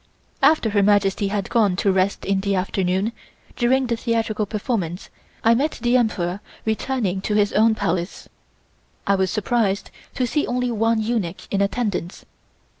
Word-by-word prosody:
After 275 -5 +4
Her 205 -1 +3
Majesty 200 0 +2
had 200 -1 -3
gone 210 -6 +3
to 195 +1 +2
rest 190 +1 0
in 195 0 +1
the 200 0 0
afternoon, 190 +2 0 0.4
during 260 +2 +2
the 235 -1 0
theatrical 225 -2 -1
performance 200 -5 -3 0.3
I 230 - +5
met 285 +6 0
the 240 0 +1
Emperor 200 -6 0 0.3
returning 220 -4 -1
to 210 - -1
his 205 -1 +2
own 220 +1 +4
Palace. 175 -2 -2 0.8
I 200 - +3
was 190 -1 +1
surprised 210 -1 0 0.2
to 255 - +1
see 290 +5 0
only 250 0 -1
one 225 0 +1
eunuch 215 -6 -2
in 200 - +1
attendance. 200 -4 -2
210 Hz, 155 wpm, -22 LUFS, 195-235 Hz, 0.8 s, I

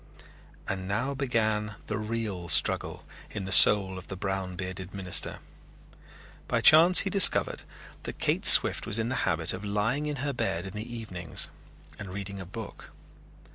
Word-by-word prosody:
And 95 -1 -5
now 120 +8 -3
began 110 -6 -2
the 105 0 -5
real 105 -5 -5
struggle - - +1 0.3
in 100 - -7
the 95 - -7
soul 95 -1 +5
of - - -15
the 95 - -7
brown 95 -1 -5
bearded 95 +1 -8
minister. 95 -2 -1 1.1
By - - -1
chance 170 +4 +6
he 195 - -4
discovered 195 -1 +5 0.4
that - - -9
Kate - - 0
Swift - - +6
was 105 - -1
in 115 +1 -3
the 130 - -3
habit 80 0 -2
of 95 +2 -8
lying 105 +9 -2
in 150 - -4
her 140 - -3
bed 115 -8 -4
in 95 - -9
the 110 +3 -8
evenings 95 -8 -6 0.5
and 100 -2 -9
reading 100 0 -7
a 95 - -10
book. 105 +2 -10
105 Hz, 165 wpm, -26 LUFS, 95-115 Hz, 1.1 s, chance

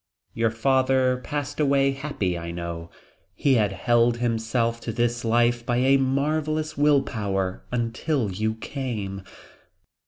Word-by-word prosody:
"Your 115 0 +1
father 130 +2 +2
passed 145 -1 -4
away 140 -2 +3
happy, 135 -10 -2
I 85 0 -5
know 85 -1 -5 0.5
he 140 - +2
had 105 -5 +3
held 120 +4 +2
himself 115 0 0
to 115 - -4
this 120 +1 -1
life 120 +1 +2
by 120 0 0
a 135 +2 +4
marvelous 155 +3 0
will 145 -1 +4
power 95 -5 -2
until 120 0 -1
you 110 +4 -1
came. 110 -6 -5
120 Hz, 130 wpm, -25 LUFS, 110-135 Hz, 0.5 s, a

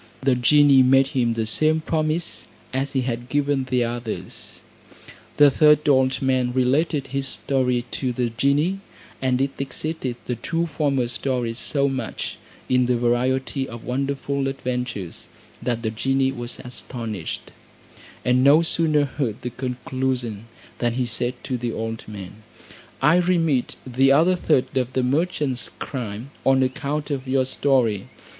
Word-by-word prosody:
The 135 -1 +4
genie 140 +2 +5
made 135 +1 +5
him 125 -5 +1
the 115 -1 -1
same 155 +8 +3
promise 155 +1 -1 0.3
as 135 +2 -1
he 135 - +1
had 120 -1 -4
given 145 -1 +1
the 125 -1 +1
others. 120 -1 -5 0.8
The 145 -1 +7
third 150 +2 +4
old 130 -1 +3
man 130 -2 +1
related 140 +3 +1
his 135 -1 +1
story 125 -2 0
to 130 -2 -2
the 120 -1 -1
genie; 145 +10 +1 0.4
and 130 -1 +1
it 135 +1 +1
exceeded 135 -1 -3
the 125 - -3
two 165 +8 -1
former 140 -5 0
stories 120 -1 -2
so 140 -1 +1
much, 130 -4 -4 0.3
in 125 -1 +3
the 125 -1 +2
variety 130 +3 0
of 115 0 -9
wonderful 140 +1 -2
adventures, 125 -8 -4 0.3
that 120 -2 -2
the 110 - -1
genie 135 +4 +1
was 120 -2 -6
astonished; 115 -7 -6 0.7
and 125 +1 +3
no 145 +4 +6
sooner 155 -3 +3
heard 130 -4 -3
the 125 - -3
conclusion, 125 -3 -3 0.3
than 120 -1 +1
he 125 +1 0
said 120 +1 -1
to 130 -3 -3
the 120 -1 -2
old 115 0 -5
man, 105 0 -9 0.6
"I 150 +5 +6
remit 165 -7 +1
the 135 +1 +3
other 165 +6 +5
third 150 -8 +1
of 130 0 -1
the 130 - +1
merchant's 140 -2 0
crime 120 -1 -5
on 135 0 +4
account 145 +3 -2
of 135 -2 -3
your 130 0 +2
story. 125 -6 +1
130 Hz, 150 wpm, -23 LUFS, 120-140 Hz, 0.8 s, The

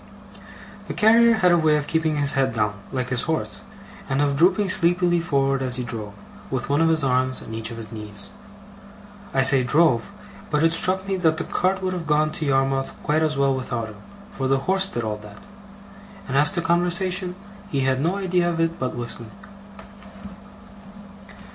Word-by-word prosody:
The - - -5
carrier 230 +2 +5
had 180 -5 +3
a 175 - +4
way 155 -1 +3
of 145 - -3
keeping 160 -1 0
his 145 -1 +1
head 135 -3 0
down, 105 -1 0 0.2
like 130 -1 -3
his 125 -2 0
horse, 160 -1 -3 0.5
and 135 - 0
of 145 -1 +1
drooping 185 +5 +3
sleepily 175 0 +2
forward 135 -5 0
as 130 -1 -1
he 125 - -3
drove, 110 -4 -6 0.4
with 130 -1 -3
one 145 +3 +2
of 165 - +3
his 160 -2 +2
arms 130 0 +1
on 110 - -9
each 115 0 -4
of 115 - -8
his 115 -1 -5
knees. 105 -2 -4 1.0
I 135 - +2
say 135 0 +5
'drove', 150 0 +2 0.4
but 150 +1 +1
it 165 - +4
struck 185 +3 +2
me 195 -1 -1
that 160 -3 +1
the 165 - -2
cart 190 +1 -1
would 185 0 -1
have 170 -3 -5
gone 155 0 +2
to 155 - -4
Yarmouth 135 0 0
quite 155 +1 +1
as 155 -2 0
well 140 -1 +2
without 120 -3 -4
him, 105 -2 -13 0.3
for 135 - -3
the 135 0 +1
horse 190 0 +2
did 120 - -4
all 105 -1 -3
that; 105 -1 -13 0.9
and 135 - -3
as 145 +2 +5
to 175 - -2
conversation, 180 +2 0 0.3
he 140 - -1
had 130 0 +1
no 170 +5 0
idea 180 -3 0
of 165 -1 -3
it 165 0 0
but 130 -1 -3
whistling. 120 -1 -5
150 Hz, 190 wpm, -23 LUFS, 130-175 Hz, 1.0 s, carrier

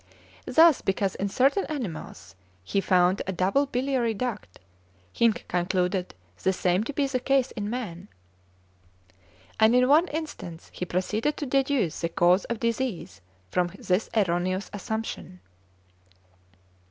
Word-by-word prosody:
Thus, 320 +1 +6
because 195 0 0
in 200 - -3
certain 275 - +2
animals 165 - -6 0.3
he 195 - 0
found 185 0 +3
a - - 0
double 195 +11 +1
biliary 250 -3 0
duct, 220 - -5 0.5
he 230 -1 +4
concluded 180 - -1 0.3
the 190 - +2
same 180 +2 +1
to 290 - -3
be 285 0 +1
the 265 -2 -1
case 270 0 +1
in 205 -2 -4
man, 205 -7 -5 1.5
and 220 +2 +5
in 250 0 +5
one 310 +6 +5
instance 295 - -7
he 180 - -4
proceeded 210 - -1
to 295 - -3
deduce 265 - 0
the 170 - -1
cause 175 +3 +3
of 235 -2 -4
disease 230 - -3 0.3
from 180 -1 +1
this 185 +4 0
erroneous 185 0 0
assumption. 205 -3 -5
210 Hz, 130 wpm, -26 LUFS, 180-255 Hz, 1.5 s, Thus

